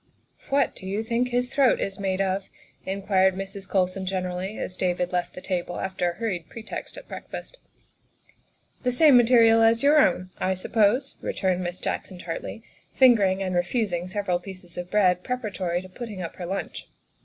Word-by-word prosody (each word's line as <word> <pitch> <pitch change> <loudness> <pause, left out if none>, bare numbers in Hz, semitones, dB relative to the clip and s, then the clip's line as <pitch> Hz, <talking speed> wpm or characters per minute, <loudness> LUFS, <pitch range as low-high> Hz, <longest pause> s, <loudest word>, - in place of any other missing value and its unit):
" - - -27
What 280 +1 +2
do 190 - -9
you 200 +3 -1
think 235 +2 0
his 245 +1 -1
throat 275 -3 +4
is 195 0 -3
made 190 -1 0
of?" 195 0 -1 0.4
in 195 +1 -3
quired 190 -1 +3
Mrs. 195 0 -6
Colson 185 0 0
generally, 185 +2 -3
as 185 - -4
David 180 -1 -1
left 180 -1 -2
the 180 - -8
table 175 -2 -3
after 190 -2 -1
a - - -4
hurried 180 -5 -3
pretext 225 -1 -7
at - - -11
breakfast. - - -8 0.6
" - - -37
The 250 - +2
same 290 +2 +6
material 230 -2 +6
as 225 +2 +4
your 295 +2 +6
own, 185 -11 +2
I 190 0 +1
suppose," 220 +7 +1
re - - -3
turned 185 -1 0
Miss 175 +1 -4
Jackson 185 - -4
tartly, 175 +5 -6 0.3
fingering 200 -7 +5
and 185 -1 -2
refusing 175 0 0
several 185 -2 -1
pieces 185 -2 -10
of 175 0 -5
bread 180 -3 +3
preparatory 195 -8 -2
to 185 - -11
putting 205 -2 -7
up 165 - -7
her 175 - -5
lunch. 195 +2 -5
190 Hz, 185 wpm, -25 LUFS, 180-225 Hz, 0.6 s, same